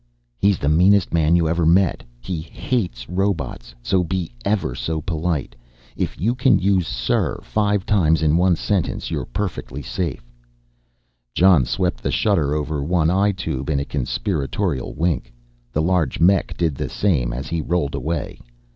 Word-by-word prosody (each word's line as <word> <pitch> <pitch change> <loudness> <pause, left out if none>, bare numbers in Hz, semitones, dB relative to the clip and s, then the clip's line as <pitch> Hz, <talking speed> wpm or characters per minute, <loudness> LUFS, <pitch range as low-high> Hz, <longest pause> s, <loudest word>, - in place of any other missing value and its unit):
"He's 100 -1 +3
the 70 - -2
meanest 90 +5 +4
man 80 0 +3
you 85 -2 +3
ever 85 +1 0
met 85 +2 +3 0.2
he 85 +5 -4
hates 80 - -3
robots 90 -10 -2
so 95 +4 +2
be 90 -1 -3
ever 100 -11 0
so 65 +6 -3
polite. 80 -2 -2 0.4
If - - -3
you 110 +9 +1
can 125 +1 +3
use 95 -3 +1
'sir' - - -1
five 105 -2 0
times 80 -7 +2
in 75 0 +3
one 90 +1 +4
sentence 95 +1 -2
you're - - -3
perfectly 85 -8 -4
safe." 75 -3 -3 1.1
Jon 90 -7 +5
swept - - -1
the - - -1
shutter 80 -9 +1
over 75 -1 -2
one 80 +1 +2
eye 100 +2 +3
tube 70 -8 -4
in 70 -2 +1
a 70 - -2
conspiratorial 75 +1 -2
wink, 85 -4 -1 0.4
the 75 - 0
large 85 -6 +1
mech 95 +2 +3
did 85 -3 +1
the - - -4
same 75 -12 +1
as 65 +3 -4
he 85 -1 -1
rolled 80 -3 -1
away. 80 -1 -3
85 Hz, 160 wpm, -21 LUFS, 75-95 Hz, 1.1 s, Jon